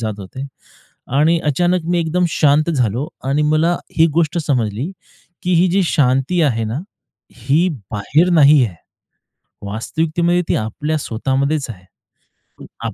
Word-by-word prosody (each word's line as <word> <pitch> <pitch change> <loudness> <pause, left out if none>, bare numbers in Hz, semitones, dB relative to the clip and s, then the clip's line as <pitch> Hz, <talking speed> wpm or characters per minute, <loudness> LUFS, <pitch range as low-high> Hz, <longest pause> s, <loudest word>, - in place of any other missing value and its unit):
जात 110 -2 -3
होते 130 +8 -7 0.7
आणि 165 +3 +3
अचानक 175 +4 +1
मी 175 - +2
एकदम 170 +2 0
शांत 150 +2 +2
झालो 125 +1 -1 0.2
आणि 140 +3 +1
मला 155 +3 +2 0.2
एक 165 - +6
गोष्ट 165 0 +1
समजली, 125 - -1 0.5
की 180 - 0
ही 180 +2 +4
जी 195 +1 +2
शांती 135 +3 +1
आहे 115 -6 +1
ना, 110 +4 -3 0.6
ही 140 +10 +1 0.2
बाहेर 150 - +1
नाही 150 -4 +6
आहे. 100 -7 -5 0.9
वास्तविकतेमध्ये 165 - 0
ती - - +2
आपल्या 150 +9 -2
स्वतः 130 +2 -3
मध्येच 140 +1 0
आहे. 95 -4 -10 1.0
आप 110 - -5
150 Hz, 140 wpm, -18 LUFS, 125-170 Hz, 1.0 s, एक